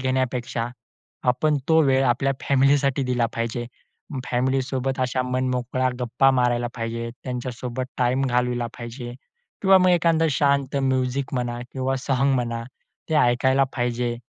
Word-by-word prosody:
घेण्यापेक्षा 125 Hz, -2 st, -1 dB, 0.6 s
आपण 150 Hz, +5 st, +2 dB
तो 160 Hz, 0 st, +5 dB
वेळ 135 Hz, -2 st, +3 dB
आपल्या 135 Hz, +2 st, +2 dB
फॅमिलीसाठी 140 Hz, 0 st, +2 dB
दिला 125 Hz, -2 st, +1 dB
पाहिजे. 115 Hz, +1 st, -3 dB, 0.6 s
फॅमिलीसोबत 130 Hz, +1 st, -1 dB
अशा 130 Hz, 0 st, 0 dB
मनमोकळा 130 Hz, 0 st, -1 dB
गप्पा 125 Hz, +3 st, +3 dB
मारायला 120 Hz, -2 st, +1 dB
पाहिजे. 115 Hz, 0 st, -4 dB
त्यांच्यासोबत 125 Hz, 0 st, -4 dB
टाईम 125 Hz, +1 st, +2 dB
घालवला 125 Hz, -1 st, 0 dB
पाहिजे 120 Hz, +1 st, -7 dB, 0.5 s
किंवा 190 Hz, -1 st, +7 dB
मग 185 Hz, -, +4 dB
एखादं 165 Hz, -2 st, +3 dB
शांत 140 Hz, -1 st, +1 dB
म्युझिक 130 Hz, 0 st, 0 dB
म्हणा 120 Hz, -1 st, -2 dB
किंवा 135 Hz, 0 st, -1 dB
सॉन्ग 135 Hz, +1 st, +1 dB
म्हणा 120 Hz, -2 st, -2 dB, 0.5 s
ते 160 Hz, -, 0 dB
ऐकायला 130 Hz, 0 st, +3 dB
पाहिजे 120 Hz, -1 st, -1 dB
130 Hz, 125 wpm, -23 LUFS, 120-135 Hz, 0.6 s, किंवा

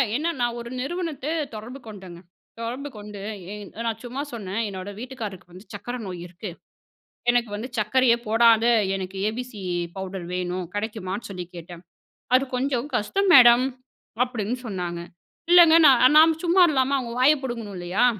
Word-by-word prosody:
என்னனா 295 Hz, -3 st, 0 dB
ஒரு 235 Hz, 0 st, -7 dB
நிறுவனத்த 320 Hz, -2 st, -4 dB, 0.3 s
தொடர்பு 235 Hz, +5 st, -8 dB
கொண்டேங்க. 190 Hz, -5 st, -10 dB, 0.4 s
தொடர்பு 250 Hz, +5 st, -4 dB
கொண்டு, 205 Hz, -1 st, -9 dB, 0.3 s
என் 210 Hz, -2 st, -9 dB, 0.2 s
நான் 225 Hz, 0 st, -3 dB
சும்மா 250 Hz, +3 st, -5 dB
சொன்னேன், 205 Hz, -1 st, -3 dB
என்னோட 190 Hz, -1 st, -6 dB
வீட்டுக்காரருக்கு 215 Hz, -8 st, -7 dB
வந்து 185 Hz, +4 st, -13 dB
சர்க்கரை 245 Hz, +1 st, -6 dB
நோய் 180 Hz, -2 st, -6 dB
இருக்கு, 180 Hz, +4 st, -8 dB, 0.8 s
எனக்கு 240 Hz, -2 st, +1 dB
வந்து 220 Hz, +4 st, -5 dB
சர்க்கரையே 235 Hz, +3 st, +3 dB
போடாத 225 Hz, 0 st, +5 dB, 0.3 s
எனக்கு 190 Hz, 0 st, -5 dB
ஏபிசி 240 Hz, -1 st, -7 dB, 0.4 s
பவுடர் 190 Hz, -2 st, -6 dB
வேணும், 180 Hz, 0 st, -3 dB
கிடைக்குமான்னு 205 Hz, -1 st, -4 dB
சொல்லி 180 Hz, -2 st, -6 dB
கேட்டேன், 170 Hz, 0 st, -10 dB, 0.5 s
அது 255 Hz, +1 st, +5 dB
கொஞ்சம் 260 Hz, 0 st, -1 dB
கஷ்டம் 390 Hz, -, 0 dB
மேடம், 240 Hz, -1 st, +8 dB, 0.6 s
அப்டின்னு 240 Hz, -2 st, -3 dB
சொன்னாங்க. 180 Hz, -5 st, -4 dB, 0.5 s
இல்லங்க 345 Hz, -2 st, +8 dB
நான் 260 Hz, +1 st, +6 dB
நாம் 320 Hz, 0 st, +5 dB
சும்மா 355 Hz, +2 st, +5 dB
இல்லாம 270 Hz, -1 st, +1 dB
அவங்க 240 Hz, -3 st, -5 dB
வாய 265 Hz, +4 st, +7 dB
புடுங்கணும் 230 Hz, -6 st, -5 dB
இல்லையா, 175 Hz, +6 st, 0 dB
230 Hz, 140 wpm, -24 LUFS, 195-255 Hz, 0.8 s, மேடம்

